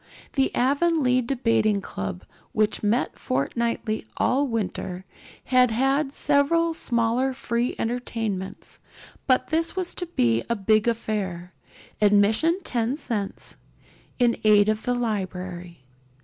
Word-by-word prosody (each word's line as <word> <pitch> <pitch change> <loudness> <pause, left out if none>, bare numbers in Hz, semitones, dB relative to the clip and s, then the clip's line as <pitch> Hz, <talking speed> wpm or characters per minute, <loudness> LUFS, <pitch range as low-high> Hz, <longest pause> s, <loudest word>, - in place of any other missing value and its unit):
The 270 -2 +2
Avonlea 275 -1 +2
Debating 230 -4 +1
Club, 95 - -6 0.3
which 215 -1 +1
met 220 +4 0
fortnightly 215 - -2
all 280 +3 +2
winter, 190 -5 -3 0.4
had 255 -1 +4
had 270 +5 +1
several 300 +4 +2
smaller 240 -1 +1
free 240 -1 -2
entertainments; 225 -5 -4 0.5
but 255 -1 +2
this 330 +2 0
was 370 -2 -3
to 355 - -5
be 115 - +1
a 235 - +1
big 215 +2 +2
affair, 195 -6 -2 0.5
admission 215 - +3
ten 240 +1 -1
cents, 210 -9 -5 0.6
in 240 -2 +2
aid 210 -1 +5
of 215 0 -1
the 245 - +1
library. 185 - -4
230 Hz, 115 wpm, -25 LUFS, 205-265 Hz, 0.6 s, aid